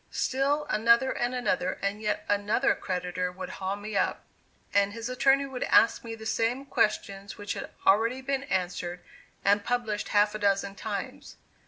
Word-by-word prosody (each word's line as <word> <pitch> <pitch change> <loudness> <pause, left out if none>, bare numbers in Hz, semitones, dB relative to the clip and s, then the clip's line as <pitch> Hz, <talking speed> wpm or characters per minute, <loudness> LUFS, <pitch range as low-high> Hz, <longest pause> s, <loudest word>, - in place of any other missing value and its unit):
Still 280 +3 0
another 235 +3 +4
and 245 +1 -1
another, 185 -7 0
and 200 +2 -1
yet 210 -1 -1
another 205 +6 +2
creditor 180 0 -3
would 185 0 -7
haul 190 +1 -1
me 205 +1 -7
up; - - 0 0.5
and 200 0 +3
his 230 +2 -5
attorney 270 +2 +3
would 265 -2 -7
ask 230 - +4
me 230 -1 -6
the 220 0 -11
same 230 +4 0
questions 200 -5 -1
which 205 -1 -4
had - - -6 0.2
already 230 +6 +3
been 270 0 -1
answered 180 -3 -2 0.4
and 205 +1 +4
published 225 -3 -1
half 205 0 +3
a 215 - -4
dozen 200 -1 +1
times. 200 +1 -6
210 Hz, 165 wpm, -28 LUFS, 195-245 Hz, 0.5 s, another